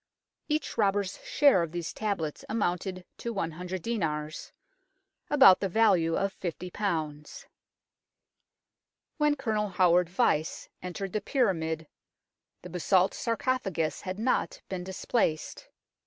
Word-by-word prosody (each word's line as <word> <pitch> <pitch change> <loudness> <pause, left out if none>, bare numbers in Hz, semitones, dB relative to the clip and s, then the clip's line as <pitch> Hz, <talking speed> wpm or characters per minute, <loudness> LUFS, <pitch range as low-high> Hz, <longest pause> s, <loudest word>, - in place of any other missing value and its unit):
Each 300 -5 -1
robber's 200 -2 +1
share 280 -11 +4
of 170 -1 -3
these 170 -2 -4
tablets 195 -8 -3
amounted 185 -3 -1
to 235 - -3
100 180 -2 -4
dinars 155 -9 -3 0.8
about 270 -10 +7
the 195 - -1
value 185 -6 +3
of 195 0 0
50. 180 0 -5 2.5
When 300 -1 +3
Colonel 215 -6 -1
Howard 180 -1 +3
Vyse 175 -6 0
entered 185 +1 -5
the 215 - 0
pyra 235 -4 +2
mid 160 -1 -3 0.8
the 180 - -8
basalt 180 +2 +2
sarcophagus 225 -9 -1
had 185 0 -5
not 240 +4 0
been 185 -2 -4
displaced. 185 -3 -1
190 Hz, 110 wpm, -29 LUFS, 170-220 Hz, 2.5 s, about